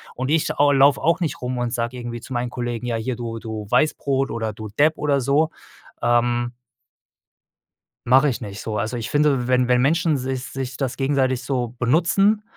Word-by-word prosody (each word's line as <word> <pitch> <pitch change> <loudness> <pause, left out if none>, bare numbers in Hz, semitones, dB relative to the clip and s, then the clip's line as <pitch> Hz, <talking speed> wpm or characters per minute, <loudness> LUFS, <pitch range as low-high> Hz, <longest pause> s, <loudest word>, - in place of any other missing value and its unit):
Und 130 +2 -3
ich 160 -1 +2
au 145 0 +5
laufe 140 +1 +5
auch 165 +2 +2
nicht 165 - -2
rum 125 0 -3
und 120 0 -2
sage 120 +1 -2
irgendwie 120 -1 -6
zu 130 - -8
meinen 120 0 -1
Kollegen, 120 -1 -4
ja, 120 - -1
hier 120 +3 -3
du 115 -1 -5
du 110 -2 -6
Weißbrot 140 -2 +1
oder 110 -1 -2
du 110 +1 -8
Depp 150 +9 +2
oder 140 -2 +1
so, 145 +5 +2 0.5
ähm 120 0 +1 1.5
Mache 135 +4 +5
ich 125 - -2
nicht 100 -2 -7
so. 110 -1 -3
Also, 110 +3 -2
ich 115 -2 -4
finde, 145 -4 +2
wenn 125 0 +2
wenn 125 -1 +4
Menschen 160 +3 +2
sich 130 -1 -3
sich 130 -1 -5
das 130 -2 -3
gegenseitig 135 -2 +1
so 125 -3 -1
benutzen, 180 - +2
125 Hz, 190 wpm, -22 LUFS, 120-140 Hz, 1.5 s, au